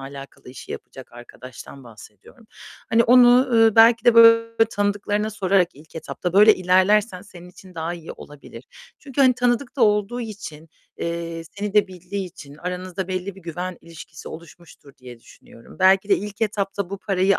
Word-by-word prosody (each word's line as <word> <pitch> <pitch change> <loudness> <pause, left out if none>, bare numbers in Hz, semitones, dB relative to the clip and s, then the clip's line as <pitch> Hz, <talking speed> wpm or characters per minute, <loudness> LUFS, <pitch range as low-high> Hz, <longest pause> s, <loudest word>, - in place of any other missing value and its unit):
alakalı 135 -1 -11
işi 130 - -10
yapacak 130 -2 -11
arkadaştan 125 +2 -13
bahsediyorum. 115 - -17 0.4
Hani, 230 +1 +3
onu, 245 0 +6 0.2
ııı, 225 -2 +3
belki 230 +1 +5
de, 240 -1 +5
böyle, 230 0 +6 0.2
tanıdıklarına 205 +1 -2
sorarak 190 -3 +1
ilk 155 +4 -19
etapta, 175 +2 -5
böyle 210 +3 +6
ilerlersen 185 +2 +1
senin 180 -3 -14
için 185 0 -17
daha 165 +1 -4
iyi 165 -1 -10
olabilir. 145 -1 -14 0.3
Çünkü, 280 -1 -5
hani, 260 -2 +5
tanıdık 245 +2 -1
da 245 - 0
olduğu 210 +3 0
için, 205 -9 -9 0.3
eee, 170 0 -5
seni 205 0 -6
de 210 -2 +3
bildiği 185 +2 -7
için 145 -4 -14
aranızda 180 +2 -6
belli 185 +1 -4
bir 195 - -16
güven 175 +2 -6
ilişkisi 165 -2 -12
oluşmuştur 160 -3 -14
diye 125 -2 -13
düşünüyorum. 115 - -18
Belki 190 +1 +3
de 200 - +4
ilk 205 +2 -8
etapta 200 -3 -3
bu 200 - -6
parayı 195 -1 0
190 Hz, 160 wpm, -21 LUFS, 165-210 Hz, 0.4 s, onu